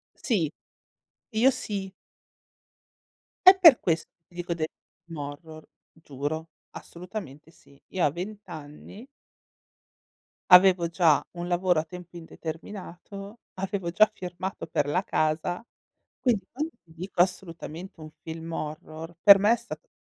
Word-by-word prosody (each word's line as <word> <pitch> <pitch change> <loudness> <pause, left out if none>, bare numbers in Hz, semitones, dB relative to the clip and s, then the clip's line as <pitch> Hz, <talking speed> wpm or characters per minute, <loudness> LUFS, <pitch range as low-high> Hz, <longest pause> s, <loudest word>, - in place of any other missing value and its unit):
Sì. 180 - 0 0.8
Io 235 +4 +4
sì. 200 -6 -4 1.6
È 375 +1 +11
per 330 -9 +9
questo 165 -2 -1 0.2
ti 175 - -24
dico 175 0 -4
del 160 -2 -1 0.4
film 165 -2 -9
horror, 155 +2 -8 0.3
giuro, 155 +1 -5 0.2
assolutamente 170 -5 -9
sì. 140 -4 -22
Io 185 -2 0
a - - +4
20 195 +7 -6
anni 155 - -10 1.5
avevo 180 -2 +8
già 165 -3 +3
un 175 - -4
lavoro 180 -1 +2
a 155 - 0
tempo 175 +1 -11
indeterminato, 185 +5 -8 0.2
avevo 190 -2 -3
già 215 +5 +5
firmato 180 +1 -6
per 145 - 0
la 180 +6 0
casa. 160 +6 -1 0.5
Quindi 235 -6 +1
quando 305 +5 -4
ti 165 - -21
dico 175 +2 -6
assolutamente 175 -1 -5
un 155 0 -9
film 165 0 -7
horror, 155 +2 -6
per 200 -1 +10
me 205 +3 +4
è 240 - +4
stato 235 0 -10
175 Hz, 130 wpm, -27 LUFS, 160-195 Hz, 1.6 s, È